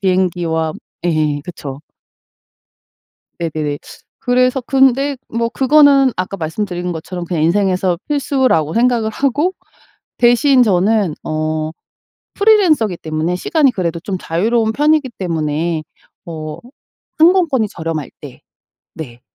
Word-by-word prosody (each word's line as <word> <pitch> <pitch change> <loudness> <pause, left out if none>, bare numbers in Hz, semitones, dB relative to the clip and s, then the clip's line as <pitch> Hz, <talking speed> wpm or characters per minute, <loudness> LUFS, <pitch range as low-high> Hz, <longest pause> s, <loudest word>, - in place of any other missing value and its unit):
비행기와 175 -4 0 0.3
예. 155 -4 0
그쵸. 145 -5 -8 1.6
네네네. 155 -3 -3 0.4
그래서 255 +1 +1
근데 270 +2 +2
뭐 230 0 -1
그거는 275 0 +4
아까 185 +2 -3
말씀드린 175 +2 -3
것처럼 175 +2 -6
그냥 165 -3 -1
인생에서 185 0 +1
필수라고 265 - +1
생각을 235 -2 +2
하고 280 +9 0 0.7
대신 250 +2 +4
저는 200 -3 +2
어 155 0 -2 0.6
프리랜서기 360 - +3
때문에 155 +2 -2
시간이 280 - +2
그래도 170 -5 -2
좀 190 +1 -4
자유로운 220 +7 0
편이기 295 +1 +2
때문에 160 -2 -2 0.4
뭐 155 -2 -7 0.6
항공권이 320 - +3
저렴할 160 -5 -5
때 135 -4 -11 0.5
네. 125 -6 -9
185 Hz, 255 characters per minute, -17 LUFS, 160-255 Hz, 1.6 s, 그거는